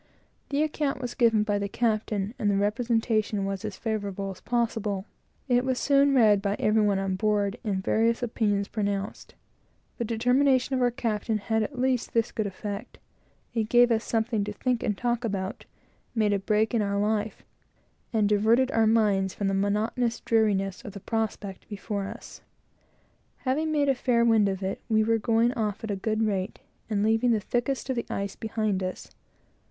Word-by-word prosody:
The 285 +2 +1
account 300 -3 -1
was 245 -2 -4
given 225 -3 +3
by 205 -1 0
the 200 0 -3
captain, 215 -2 -1
and 210 - +1
the 200 - +2
representation 215 -1 0
was 195 0 -3
as 210 -3 -5
favorable 200 -3 -3
as 185 -1 -12
possible. 225 -5 -1 0.4
It 245 -1 +3
was 260 -1 0
soon 280 0 +3
read 210 -5 +5
by 200 0 0
every 215 +1 +2
one 205 -2 +2
on 195 -1 -1
board, 205 +1 0
and 195 -4 -2
various 230 +4 +1
opinions 205 -4 0
pronounced. 200 -2 -3 0.6
The - - 0
determination 250 +4 +2
of 255 - +1
our 245 - +4
captain 225 -2 -1
had 220 +2 0
at 250 +5 -4
least 255 -2 0
this 230 -1 +2
good 215 -2 -2
effect; 205 +3 -6 0.6
it 220 -2 -1
gave 245 0 +6
every 230 - +4
one - - -6
something 225 -1 0
to 210 - -4
think 250 +2 -1
and 210 - -1
talk 240 -1 -1
about, 200 0 -3 0.5
made 215 -2 +2
a 200 - +1
break 215 +3 +1
in 230 - +2
our 200 -1 -1
life, 210 0 -1 0.7
and 215 -3 +2
diverted 225 +5 +3
our 225 -1 +3
minds 205 -4 +2
from 200 -1 -1
the - - -1
monotonous 210 +4 0
dreariness 205 -2 +1
of 205 -6 -8
the 200 - -7
prospect 210 -2 -4
before 200 -1 -4
us. - - -10 1.0
Having 305 +5 0
made 290 -2 +2
a 275 - +4
fair 245 -2 +2
wind 220 -3 +4
of 190 0 -4
it, 190 - -3
we 220 -1 +3
were 225 +1 +2
going 230 +2 +2
off 215 -4 -2
at 220 - -3
a - - -1
good 215 +3 -1
rate, 195 -2 -2 0.3
and 205 -2 0
leaving 225 +3 +2
the 225 -2 +3
thickest 245 +6 -2
of - - -1
the 235 - -3
ice 200 0 -3
behind 215 -3 -1
us. 185 0 -5
220 Hz, 185 wpm, -27 LUFS, 200-235 Hz, 1.0 s, gave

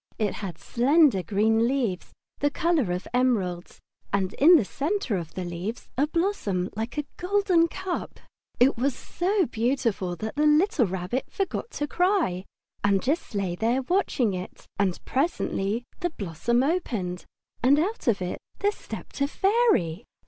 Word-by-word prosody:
It 210 -3 0
had 185 -6 -6
slender 270 - +3
green 220 +6 +2
leaves 240 -9 -1 0.3
the 290 - +2
colour 305 - +1
of 180 +1 -3
emeralds, 205 -9 0 0.3
and 195 -1 0
in 335 +6 +7
the 265 -11 +4
centre 290 - -1
of 170 -4 -5
the 185 - -3
leaves 175 +7 -5
a 285 +4 +2
blossom 305 - -1
like 225 +6 -4
a 295 - -1
golden 365 -2 +3
cup. 375 +1 -5 0.4
It 250 +1 +4
was 270 +1 +1
so 380 +1 0
beautiful 225 -7 -1
that 215 +5 -5
the 300 +1 +3
little 300 - +4
Rabbit 190 +7 -2
forgot 390 +4 -3
to 295 - -1
cry, 345 - +1 0.4
and 200 -1 +2
just 285 -4 -1
lay 195 -3 -1
there 235 +8 0
watching 260 - +1
it. 185 0 -7
And 190 -3 +1
presently 240 - -1 0.2
the 350 -1 0
blossom 230 - -1
opened, 225 - -2 0.4
and 270 +4 +5
out 380 +5 -1
of 200 -5 +2
it 180 - -4 0.2
there 410 - +2
stepped 350 - -9
a 280 - +3
fairy. 385 - +2
245 Hz, 155 wpm, -26 LUFS, -, 0.4 s, in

